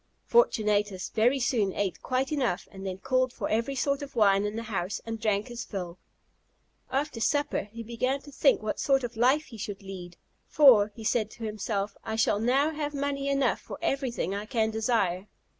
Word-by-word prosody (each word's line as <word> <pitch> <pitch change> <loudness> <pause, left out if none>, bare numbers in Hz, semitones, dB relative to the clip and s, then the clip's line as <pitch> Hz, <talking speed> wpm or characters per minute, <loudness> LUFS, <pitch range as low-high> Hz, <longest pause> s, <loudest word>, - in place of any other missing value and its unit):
Fortunatus 210 - +2
very 240 +5 +2
soon 225 -6 +1
ate 200 -3 -2
quite 260 +2 -1
enough, 250 -11 -1
and 195 0 -7
then 185 -1 -4
called 255 +3 +1
for - - -4
every 230 +5 0
sort 280 +2 0
of 280 -2 -8
wine 200 -3 +4
in 210 +1 -3
the 230 - -3
house, 205 -2 -3
and 225 -1 -4
drank 210 0 +1
his 240 -1 -6
fill. 180 -3 -6 0.9
After 270 -2 -2
supper, 290 -6 0
he 230 +1 -7
began 255 +4 -1
to 290 - -13
think 270 -4 +3
what 215 - -2
sort 270 -1 +2
of 240 -1 -4
life 260 +7 +3
he 225 -6 -12
should 200 -1 -6
lead; 180 -3 -8 0.3
"For," 235 -9 +6
said 220 -1 0
he - - -14
to 235 - -8
himself, 205 -1 -3
"I 220 - -3
shall 220 -2 +2
now 270 +7 +2
have 295 -1 -4
money 280 0 -1
enough 275 -3 +1
for - - -8
everything 270 - -1
I 205 +1 -4
can 220 -2 +1
desire." 215 -4 0
230 Hz, 190 wpm, -28 LUFS, 205-270 Hz, 0.9 s, For